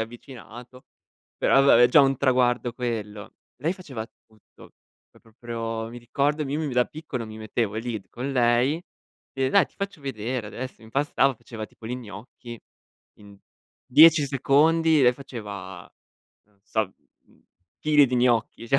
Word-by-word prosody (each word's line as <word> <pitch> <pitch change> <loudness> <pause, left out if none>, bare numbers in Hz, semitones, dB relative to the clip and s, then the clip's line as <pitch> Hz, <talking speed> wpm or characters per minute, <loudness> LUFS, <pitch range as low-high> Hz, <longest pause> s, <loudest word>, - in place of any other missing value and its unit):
avvicinato, 120 +1 -12 0.5
però, 135 - +4
vabbè, 120 -3 +6
è 120 - +6
già 145 - +6
un 135 -1 +3
traguardo 125 -2 +1
quello. 110 -4 -5 0.2
Lei 155 +7 -1
faceva 140 -12 -7 0.2
tutto, 110 -2 -20 0.4
pro - - -23
proprio, 115 0 -6
mi 120 - -9
ricordo 140 +5 -1
m - - -6
io 145 - -1
mi 160 - -2
mi 140 - -4
da 125 0 +4
piccolo, 150 -6 -6
mi 110 0 -10
mettevo 110 -1 -2
lì 115 -2 -4
con 130 +3 -5
lei 125 +5 +2 0.5
e: 135 -1 0
“Dai, - - +4
ti - - -32
faccio 200 -4 -5
vedere 125 -3 -4
adesso”. 130 0 -8
Impastava, 135 +3 0
faceva 115 -1 -9
tipo 110 - -14
li 120 - -3
gnocchi. 115 +1 -11 0.6
In 100 -1 -16 0.5
10 155 +2 +7
secondi, 155 +3 +3
lei 125 -1 +5
faceva, 100 -9 -9 0.6
non 105 -1 -34
so, 110 -4 -2 0.3
mhmm, - - -28 0.3
chili 150 -2 +4
di 125 - -1
gnocchi, 120 -1 +1
cioè, 135 - +3
125 Hz, 155 wpm, -25 LUFS, 110-140 Hz, 0.6 s, 10